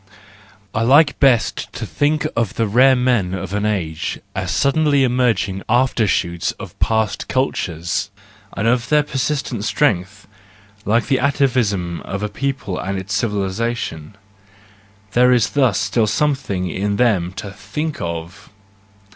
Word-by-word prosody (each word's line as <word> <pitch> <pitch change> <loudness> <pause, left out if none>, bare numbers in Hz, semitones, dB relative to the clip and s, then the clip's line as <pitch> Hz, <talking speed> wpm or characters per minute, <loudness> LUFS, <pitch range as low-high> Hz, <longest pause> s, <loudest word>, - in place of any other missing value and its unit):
—I 115 - 0
like 140 +6 +4
best 130 -5 +2
to - - -5
think 150 +1 0
of 115 -4 -1
the 115 - +1
rare 130 +5 +5
men 120 -8 +1
of 95 0 -5
an 105 +1 0
age 85 -7 -2
as - - -3
suddenly 140 0 +2
emerging 120 -6 +1
after 125 -3 +2
shoots 85 -2 0
of - - -10
past 110 -3 0
cultures, 90 - -1 0.5
and 105 +3 0
of 120 +1 +1
their 150 -1 +4
persistent 135 -5 -2
strength: 105 -4 0 0.6
like 115 +3 +2
the 135 - +1
atavism 125 - 0
of 95 +2 -5
a 105 - -1
people 135 -7 -3
and 95 +1 -3
its 95 +3 -4
civili¬ 105 -4 0
sation 105 -6 -4 1.0
:—there 125 +4 +4
is 120 -3 +3
thus 130 -9 +2
still 105 +3 +1
something 130 -8 0
in 100 +3 -2
them 100 -7 +2
to 100 +1 -7
think 150 +10 -5
of! 85 +2 -6
110 Hz, 140 wpm, -19 LUFS, 95-130 Hz, 1.0 s, rare